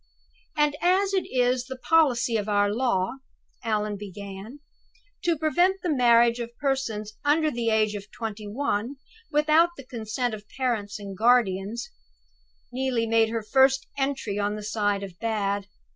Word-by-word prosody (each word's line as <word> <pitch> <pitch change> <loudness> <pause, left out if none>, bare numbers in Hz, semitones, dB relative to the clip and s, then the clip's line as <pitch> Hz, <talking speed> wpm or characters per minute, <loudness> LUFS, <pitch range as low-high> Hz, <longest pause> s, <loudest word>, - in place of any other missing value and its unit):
"'And 295 -1 +3
as 385 +2 +2
it 380 - 0
is 250 0 +1
the 260 0 -6
policy 255 -6 +3
of 210 -1 -1
our 205 0 +2
law,'" 235 -2 0 0.5
Allan 210 -2 -1
began, 200 +4 -8 0.6
"'to 340 -2 +1
prevent 350 +5 +2
the 345 -4 +1
marriage 235 -2 +4
of 235 0 -6
persons 235 -7 -2
under 305 +1 +3
the 235 -3 -1
age 215 -1 +2
of 205 0 -7
twenty 215 -2 -6
one, 235 +1 -2 0.4
without 305 +3 +4
the 275 - -10
consent 235 0 -3
of 210 -1 -9
parents 225 -6 -1
and 200 -2 -8
guardians'" 220 -1 +1 0.8
(Neelie 255 -2 0
made 225 0 +3
her 225 -1 -3
first 265 +4 +3
entry 270 -7 -2
on 205 +1 0
the 210 - -7
side 205 -1 0
of 185 -3 -9
"Bad!" 205 -3 -1
230 Hz, 150 wpm, -26 LUFS, 210-270 Hz, 0.8 s, marriage